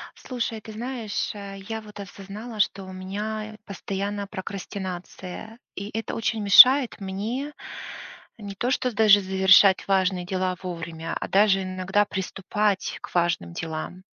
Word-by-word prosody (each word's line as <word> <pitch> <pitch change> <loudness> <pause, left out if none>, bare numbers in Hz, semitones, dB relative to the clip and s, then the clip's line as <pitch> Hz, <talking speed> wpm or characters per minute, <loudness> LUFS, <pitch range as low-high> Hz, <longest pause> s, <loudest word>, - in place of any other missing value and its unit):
Слушай, 235 -3 -4
ты 220 - -10
знаешь, 230 -1 -3
а, 200 -1 -8
я 220 +3 -6
вот 210 -1 -12
осознала, 205 +4 -8
что 195 0 +1
у 190 - -9
меня 210 +3 -5
постоянно 200 +1 -4
прокрастинация, 190 +1 -7 0.2
и 200 +2 -5
это 225 - -4
очень 225 -1 -1
мешает 250 +7 +8
мне 220 +9 -4 0.9
не 200 -2 -7
то 245 +6 -1
что 255 -2 0
даже 210 -1 +6
завершать 190 0 +5
важные 190 -2 +1
дела 185 0 -1
вовремя, 165 -3 -5
а - - -4
даже 195 -1 +4
иногда 185 +2 0
приступать 195 +1 -2
к - - -10
важным 170 - 0
делам. 165 - -5
200 Hz, 135 wpm, -25 LUFS, 185-215 Hz, 0.9 s, мешает